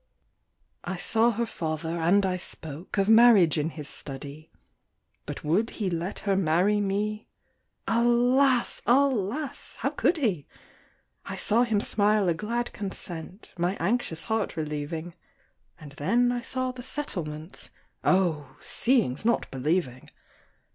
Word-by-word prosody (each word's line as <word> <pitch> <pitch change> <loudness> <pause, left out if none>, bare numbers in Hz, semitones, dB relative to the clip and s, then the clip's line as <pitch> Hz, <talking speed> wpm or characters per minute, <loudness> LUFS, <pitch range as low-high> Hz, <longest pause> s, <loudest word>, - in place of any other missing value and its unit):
I 180 +1 -4
saw 225 +6 +2
her 235 +1 -1
father, 160 -4 -3
and 190 +5 +3
I 185 -1 0
spoke 165 -1 -4
Of 195 0 +2
marriage 220 -8 +6
in 150 +2 0
his 150 -3 -8
study; 140 +3 -6 0.8
But - - -6
would 190 +10 +1
he 200 -5 -1
let 170 +3 -3
her 200 -1 +2
marry 190 +3 +2
me 210 +2 -2 0.6
Alas! 240 +2 +3
alas! 265 +1 +1
how - - -2
could 345 - +1
he? 200 - -1 0.8
I - - -6
saw 225 +3 +2
him 225 -4 +2
smile 210 -1 +2
a 170 - +3
glad 235 +7 -3
consent, 190 -1 -7
My 175 +3 +1
anxious 170 -3 -1
heart 220 -5 -2
relieving, 155 +2 -4 0.7
And 150 -3 -11
then 235 +13 +2
I 245 0 -2
saw 255 +1 -2
the 250 0 -9
settlements 175 - -5 0.3
Oh! 160 -8 +1
seeing's 230 - +1
not 235 +1 +1
believing! 135 -1 -1
195 Hz, 130 wpm, -27 LUFS, 160-235 Hz, 0.8 s, marriage